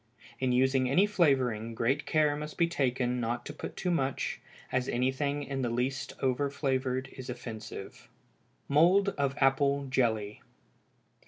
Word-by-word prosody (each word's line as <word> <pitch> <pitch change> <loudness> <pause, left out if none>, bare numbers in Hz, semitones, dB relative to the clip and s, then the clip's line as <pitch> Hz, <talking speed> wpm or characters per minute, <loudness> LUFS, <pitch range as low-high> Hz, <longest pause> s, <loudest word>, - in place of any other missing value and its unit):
In 130 -1 +1
using 130 +1 +3
any 180 +10 +5
flavoring, 130 - +1
great 135 +6 0
care 150 -2 +3
must 150 +1 -6
be 170 - +4
taken 125 -6 0
not 120 +1 -2
to - - -6
put - - -7
too 180 - -1
much, 135 -5 -1 0.3
as 125 0 0
anything 135 +4 0
in 135 -1 -3
the 120 - 0
least 130 +4 -2
over 135 +2 +1
flavored 130 -2 -1
is 130 -1 -9
offensive. 110 -5 -8 0.6
_Mould 180 +7 +5
of 140 -1 -1
Apple 140 +1 +2
Jelly. 110 -5 0
130 Hz, 145 wpm, -30 LUFS, 125-145 Hz, 0.6 s, any